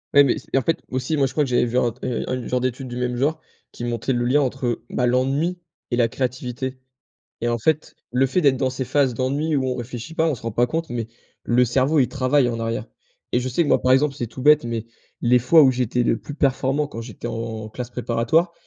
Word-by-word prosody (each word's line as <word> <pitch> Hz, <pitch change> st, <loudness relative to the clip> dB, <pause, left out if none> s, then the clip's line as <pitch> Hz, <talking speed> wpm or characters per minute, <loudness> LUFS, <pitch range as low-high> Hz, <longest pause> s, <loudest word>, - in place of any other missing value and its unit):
Ouais, 145 Hz, -, +9 dB
mais 135 Hz, -, +1 dB
ce -, -, -19 dB
et -, -, +4 dB
en -, -, +3 dB
fait 165 Hz, -, 0 dB
aussi 130 Hz, +5 st, -1 dB
moi, 135 Hz, -1 st, +3 dB
je -, -, -9 dB
crois 150 Hz, -, +2 dB
que 135 Hz, -, -3 dB
j'avais 120 Hz, 0 st, +3 dB
vu 120 Hz, +1 st, -1 dB
un 120 Hz, -1 st, +2 dB
t 125 Hz, +3 st, -10 dB
heu, 125 Hz, -, -2 dB
un -, -, -1 dB
une 125 Hz, -2 st, -5 dB
genre 125 Hz, 0 st, 0 dB
d'étude 130 Hz, +1 st, -2 dB
du 120 Hz, -, -6 dB
même 125 Hz, 0 st, -1 dB
genre 145 Hz, +6 st, 0 dB, 0.3 s
qui -, -, -8 dB
montait 120 Hz, +2 st, -1 dB
le 120 Hz, 0 st, 0 dB
lien 140 Hz, +4 st, +3 dB
entre, 130 Hz, -1 st, -2 dB
heu, 120 Hz, -1 st, -1 dB
bah, 125 Hz, -, 0 dB
l'ennui 135 Hz, +8 st, +1 dB, 0.3 s
et -, -, +2 dB
la 120 Hz, -2 st, +4 dB
créativité 130 Hz, +1 st, -4 dB, 0.6 s
et 120 Hz, -, -1 dB
en 120 Hz, -, 0 dB
fait, 155 Hz, +6 st, 0 dB, 0.2 s
le 125 Hz, +2 st, +3 dB
fait 160 Hz, +7 st, +1 dB
d'être 140 Hz, -4 st, +4 dB
dans 130 Hz, 0 st, +1 dB
ces 130 Hz, +1 st, -3 dB
phases 135 Hz, 0 st, +1 dB
d'ennui 140 Hz, +6 st, 0 dB
où 135 Hz, -, +1 dB
on 125 Hz, -, -1 dB
réfléchit 125 Hz, +5 st, -7 dB
pas, 160 Hz, -, +2 dB
on 160 Hz, -, +1 dB
se 115 Hz, -, -14 dB
rend 115 Hz, -, -3 dB
pas 120 Hz, +3 st, +2 dB
compte, 165 Hz, +6 st, -3 dB
mais 115 Hz, -2 st, -3 dB, 0.4 s
le 120 Hz, +1 st, +3 dB
cerveau 130 Hz, +5 st, +2 dB
il 125 Hz, -, +3 dB
travaille 130 Hz, -1 st, +2 dB
en 115 Hz, -, -3 dB
arrière 115 Hz, -1 st, -2 dB, 0.5 s
et 125 Hz, -, +2 dB
je 125 Hz, -, -3 dB
sais 150 Hz, +7 st, +2 dB
que -, -, -3 dB
moi, -, -, +4 dB
par 130 Hz, -, +3 dB
exemple, 140 Hz, +1 st, +2 dB
c'est 120 Hz, -4 st, -3 dB
tout 120 Hz, +3 st, -9 dB
bête, 150 Hz, +1 st, +6 dB
mais, 115 Hz, -1 st, -3 dB, 0.4 s
les 125 Hz, +1 st, +5 dB
fois 160 Hz, +7 st, +6 dB
où 135 Hz, -, +6 dB
j'étais 125 Hz, -1 st, 0 dB
le 115 Hz, -, +2 dB
plus 145 Hz, -, -8 dB
performant 140 Hz, +1 st, +1 dB
quand 115 Hz, -, -7 dB
j'étais 115 Hz, 0 st, -7 dB
en 115 Hz, -1 st, -4 dB
classe 120 Hz, +2 st, -6 dB
préparatoire, 125 Hz, +8 st, +1 dB
125 Hz, 265 wpm, -22 LUFS, 120-140 Hz, 0.6 s, Ouais